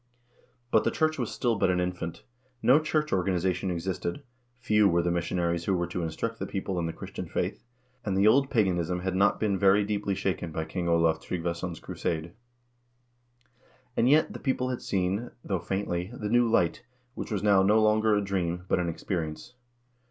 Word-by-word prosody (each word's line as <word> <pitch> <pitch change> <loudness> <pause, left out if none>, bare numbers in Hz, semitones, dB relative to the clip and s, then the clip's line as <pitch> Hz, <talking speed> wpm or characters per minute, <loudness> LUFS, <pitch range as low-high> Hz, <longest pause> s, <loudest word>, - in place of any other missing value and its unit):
But - - +4
the - - +2
church 155 -2 0
was 120 - -1
still 120 -3 0
but - - +3
an 90 0 +2
infant. 90 -2 -3 0.4
No 130 +6 +6
church 155 -1 -1
organization 95 0 0
existed, 90 - -3 0.3
few 105 -4 +3
were 85 -1 +2
the 85 - +1
missionaries 85 0 -1
who 95 - +2
were 85 -1 0
to 85 +1 -4
instruct 115 +8 -3
the - - -3
people 95 -2 -3
in 85 - -1
the - - -2
Christian - - -7
faith, - - -2 0.4
and 100 -3 -1
the 100 - +4
old 135 +5 +5
paganism 90 -6 +1
had 95 0 -2
not 100 +2 +3
been 100 -3 0
very 100 +1 +5
deeply 100 -1 -1
shaken 95 -3 -2
by 80 0 -3
King 85 +2 -3
Olav 85 -1 +3
Tryggvason's 85 0 -3
crusade. 80 +1 -4 1.6
And 120 - +3
yet, 155 +3 +4
the - - -7
people 130 -2 -1
had 125 - -3
seen, 95 +5 -1 0.2
though 95 -3 -1
faintly, 90 -1 -2
the 105 -4 -5
new 120 +1 +4
light, 90 -7 +2 0.3
which - - -6
was 105 -3 -2
now 100 -2 +5
no 105 +3 +4
longer 110 0 +3
a 105 - +2
dream, 90 -3 -2
but - - +2
an 85 -1 0
experience. 80 +1 -4
95 Hz, 185 wpm, -28 LUFS, 85-110 Hz, 1.6 s, No